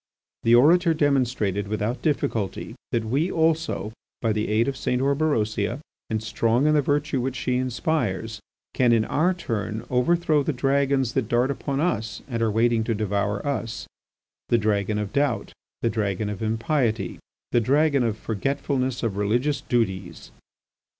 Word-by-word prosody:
The 115 Hz, +1 st, +5 dB
orator 165 Hz, +6 st, +5 dB
demonstrated 125 Hz, -9 st, +1 dB
without 110 Hz, +4 st, -2 dB
difficulty 115 Hz, -, -1 dB, 0.2 s
that 115 Hz, -1 st, 0 dB
we, 140 Hz, +10 st, 0 dB
also, 160 Hz, -, 0 dB, 0.3 s
by 115 Hz, -2 st, +1 dB
the 105 Hz, 0 st, -1 dB
aid 110 Hz, +3 st, +2 dB
of 140 Hz, -, -1 dB
St. 125 Hz, -1 st, -1 dB
Orberosia, 135 Hz, -5 st, 0 dB, 0.3 s
and 110 Hz, 0 st, -2 dB
strong 115 Hz, +4 st, +1 dB
in 155 Hz, -, +4 dB
the 150 Hz, -, +4 dB
virtue 145 Hz, -1 st, 0 dB
which 130 Hz, +1 st, -2 dB
she 125 Hz, 0 st, -1 dB
inspires, 120 Hz, -4 st, -1 dB, 0.3 s
can 125 Hz, -2 st, +3 dB
in 110 Hz, -1 st, +3 dB
our 175 Hz, +5 st, +1 dB
turn 110 Hz, -, -3 dB
overthrow 155 Hz, +4 st, +2 dB
the 150 Hz, +2 st, -1 dB
dragons 135 Hz, -1 st, +1 dB
that 115 Hz, -, 0 dB
dart 120 Hz, +3 st, +2 dB
upon 140 Hz, 0 st, -3 dB
us 110 Hz, -, -1 dB
and 115 Hz, -4 st, -3 dB
are 115 Hz, -, +2 dB
waiting 115 Hz, +1 st, +2 dB
to 115 Hz, -1 st, 0 dB
devour 100 Hz, -1 st, -1 dB
us, 125 Hz, -5 st, -3 dB, 0.6 s
the 120 Hz, -, +4 dB
dragon 105 Hz, -1 st, 0 dB
of 105 Hz, -1 st, -3 dB
doubt, 140 Hz, -4 st, 0 dB, 0.3 s
the 115 Hz, -, +3 dB
dragon 105 Hz, -1 st, -1 dB
of 105 Hz, -, -6 dB
impiety, 115 Hz, +1 st, -1 dB, 0.3 s
the 120 Hz, -, +3 dB
dragon 140 Hz, +3 st, +3 dB
of 115 Hz, -3 st, 0 dB
forgetfulness 130 Hz, +3 st, -2 dB
of 105 Hz, -4 st, -1 dB
religious 125 Hz, +7 st, 0 dB
duties. 95 Hz, -8 st, -2 dB
120 Hz, 155 wpm, -24 LUFS, 110-140 Hz, 0.6 s, The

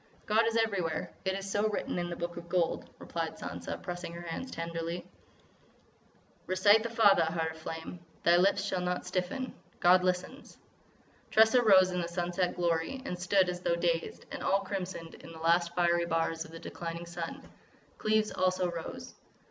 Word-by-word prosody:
"God 220 Hz, +2 st, +3 dB
is 230 Hz, 0 st, +1 dB
everywhere. 195 Hz, -8 st, 0 dB
It 190 Hz, -, +1 dB
is 195 Hz, 0 st, -4 dB
so 205 Hz, +2 st, +1 dB
written 205 Hz, -, -2 dB
in 175 Hz, 0 st, -2 dB
the 170 Hz, -, -4 dB
Book 170 Hz, 0 st, -4 dB
of 170 Hz, 0 st, -9 dB
Gold," 175 Hz, -2 st, 0 dB
replied -, -, -4 dB
Sansa, -, -, -5 dB
pressing 175 Hz, -1 st, -5 dB
her 170 Hz, 0 st, -7 dB
hands 170 Hz, +10 st, -5 dB
tenderly. 165 Hz, 0 st, -4 dB, 1.4 s
"Recite 205 Hz, +4 st, +5 dB
the 235 Hz, -, -3 dB
Fatha, 205 Hz, -7 st, +5 dB
Heart 160 Hz, 0 st, -1 dB
of 160 Hz, -, -11 dB
Flame. 165 Hz, +2 st, -6 dB, 0.2 s
Thy 170 Hz, -, +6 dB
lips 195 Hz, +2 st, +3 dB
shall 185 Hz, -2 st, -1 dB
not 180 Hz, 0 st, -2 dB
stiffen; 185 Hz, +8 st, -2 dB, 0.3 s
God 180 Hz, +1 st, +6 dB
listens." 185 Hz, +9 st, -2 dB, 0.7 s
Tressa 220 Hz, +3 st, +6 dB
rose 190 Hz, -5 st, +6 dB
in 180 Hz, 0 st, -1 dB
the 170 Hz, -, -2 dB
sunset 175 Hz, +1 st, -1 dB
glory 175 Hz, +9 st, -1 dB
and 180 Hz, -7 st, -4 dB
stood 185 Hz, +1 st, +3 dB
as 180 Hz, 0 st, -3 dB
though 170 Hz, -, +1 dB
dazed, 170 Hz, -1 st, -1 dB
and -, -, -5 dB
all 195 Hz, +1 st, +2 dB
crimsoned 185 Hz, -4 st, -5 dB
in -, -, -10 dB
the -, -, -10 dB
last 170 Hz, +1 st, +2 dB
fiery 175 Hz, -1 st, +3 dB
bars 165 Hz, 0 st, 0 dB
of 155 Hz, -, -13 dB
the 165 Hz, -, -8 dB
declining 170 Hz, 0 st, -6 dB
sun. 170 Hz, -1 st, -6 dB, 0.5 s
Cleves 215 Hz, 0 st, +2 dB
also 185 Hz, -1 st, +1 dB
rose. 165 Hz, -1 st, -7 dB
180 Hz, 175 wpm, -31 LUFS, 170-195 Hz, 1.4 s, Thy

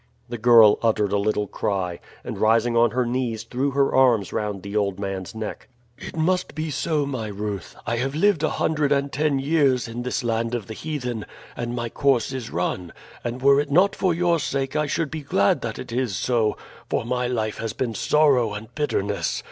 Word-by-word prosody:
The 120 Hz, -1 st, -5 dB
girl 115 Hz, -2 st, +7 dB
uttered 105 Hz, -3 st, +1 dB
a 100 Hz, -, +2 dB
little 105 Hz, 0 st, 0 dB
cry, 95 Hz, -3 st, -2 dB, 0.2 s
and -, -, -6 dB
rising 115 Hz, +2 st, +3 dB
on 115 Hz, 0 st, +5 dB
her 125 Hz, +2 st, 0 dB
knees 120 Hz, -2 st, -2 dB
threw 125 Hz, +4 st, -1 dB
her 140 Hz, 0 st, +1 dB
arms 120 Hz, -7 st, +3 dB
round 105 Hz, -3 st, -3 dB
the 100 Hz, +1 st, -6 dB
old 100 Hz, -2 st, 0 dB
man's 95 Hz, 0 st, -4 dB
neck. 110 Hz, -1 st, -6 dB, 0.3 s
"It -, -, -8 dB
must 180 Hz, +3 st, 0 dB
be 155 Hz, 0 st, -3 dB
so, 150 Hz, +1 st, 0 dB
my 130 Hz, -6 st, -3 dB
Ruth. 105 Hz, -1 st, -5 dB
I 115 Hz, -, -1 dB
have 135 Hz, +4 st, -2 dB
lived 190 Hz, 0 st, +3 dB
a 155 Hz, -, +2 dB
hundred 150 Hz, -2 st, 0 dB
and 140 Hz, 0 st, +1 dB
ten 150 Hz, 0 st, +1 dB
years 135 Hz, -3 st, +2 dB
in 115 Hz, +1 st, -5 dB
this 125 Hz, 0 st, -2 dB
land 115 Hz, 0 st, -1 dB
of 115 Hz, -4 st, -4 dB
the 110 Hz, -, -7 dB
heathen, 125 Hz, -6 st, -4 dB, 0.3 s
and 120 Hz, 0 st, -4 dB
my 120 Hz, -1 st, -2 dB
course 135 Hz, +1 st, +1 dB
is 125 Hz, -3 st, -5 dB
run; 90 Hz, 0 st, -3 dB, 0.3 s
and 125 Hz, +2 st, -4 dB
were 140 Hz, 0 st, +6 dB
it 145 Hz, 0 st, -1 dB
not 185 Hz, +7 st, +4 dB
for 185 Hz, -, +1 dB
your 170 Hz, 0 st, +2 dB
sake 135 Hz, 0 st, -2 dB
I 150 Hz, -1 st, +1 dB
should 155 Hz, 0 st, -1 dB
be 160 Hz, -1 st, -4 dB
glad 100 Hz, -8 st, +2 dB
that -, -, -4 dB
it -, -, -8 dB
is 120 Hz, -4 st, -1 dB
so, 115 Hz, 0 st, +1 dB, 0.3 s
for -, -, -1 dB
my 125 Hz, +1 st, -1 dB
life 110 Hz, -3 st, -2 dB
has 115 Hz, -2 st, -3 dB
been 120 Hz, -3 st, -2 dB
sorrow 125 Hz, -2 st, +3 dB
and 110 Hz, +1 st, -9 dB
bitterness. 105 Hz, -9 st, -1 dB
120 Hz, 205 wpm, -23 LUFS, 110-140 Hz, 0.3 s, girl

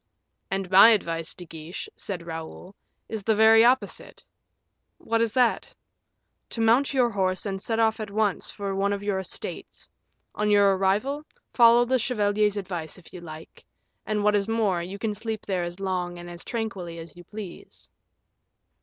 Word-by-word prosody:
"And 195 Hz, -1 st, -2 dB
my 195 Hz, +4 st, +9 dB
advice, 165 Hz, -7 st, 0 dB
De 180 Hz, -, -9 dB
Guiche," 165 Hz, -, -8 dB
said 180 Hz, -4 st, -6 dB
Raoul, 165 Hz, +3 st, -8 dB, 0.3 s
"is 220 Hz, -1 st, -5 dB
the 220 Hz, +2 st, +1 dB
very 220 Hz, +1 st, +7 dB
opposite." 250 Hz, +2 st, 0 dB, 0.7 s
"What 230 Hz, 0 st, -1 dB
is 230 Hz, -1 st, +1 dB
that?" 250 Hz, -3 st, +1 dB, 0.7 s
"To -, -, -5 dB
mount 230 Hz, +5 st, +3 dB
your 250 Hz, -3 st, +2 dB
horse 185 Hz, -2 st, -1 dB
and 195 Hz, -1 st, -3 dB
set 225 Hz, +2 st, -2 dB
off 225 Hz, -1 st, +2 dB
at 215 Hz, -1 st, -5 dB
once 205 Hz, -1 st, -1 dB
for 200 Hz, -2 st, -4 dB
one 200 Hz, +1 st, 0 dB
of 200 Hz, 0 st, -4 dB
your 200 Hz, -2 st, -1 dB
estates; 190 Hz, -, -7 dB, 0.5 s
on 210 Hz, 0 st, -1 dB
your 200 Hz, -1 st, +5 dB
arrival, 210 Hz, +10 st, 0 dB, 0.3 s
follow 235 Hz, 0 st, +6 dB
the 260 Hz, +1 st, +1 dB
chevalier's 210 Hz, -3 st, +1 dB
advice, 175 Hz, -5 st, -5 dB
if 180 Hz, -, -17 dB
you 180 Hz, -, -9 dB
like; 160 Hz, -1 st, -11 dB, 0.4 s
and, 210 Hz, -1 st, -1 dB
what 210 Hz, 0 st, +3 dB
is 200 Hz, 0 st, +1 dB
more, 215 Hz, -6 st, +1 dB
you 185 Hz, +3 st, -6 dB
can 215 Hz, +1 st, -2 dB
sleep 220 Hz, +1 st, -5 dB
there 190 Hz, -3 st, -1 dB
as 175 Hz, +2 st, -6 dB
long 180 Hz, -2 st, -2 dB
and 175 Hz, 0 st, -9 dB
as 175 Hz, 0 st, -9 dB
tranquilly 195 Hz, -8 st, -4 dB
as 165 Hz, -1 st, -10 dB
you 175 Hz, -, -12 dB
please." 205 Hz, -1 st, -10 dB
200 Hz, 170 wpm, -26 LUFS, 180-225 Hz, 0.7 s, my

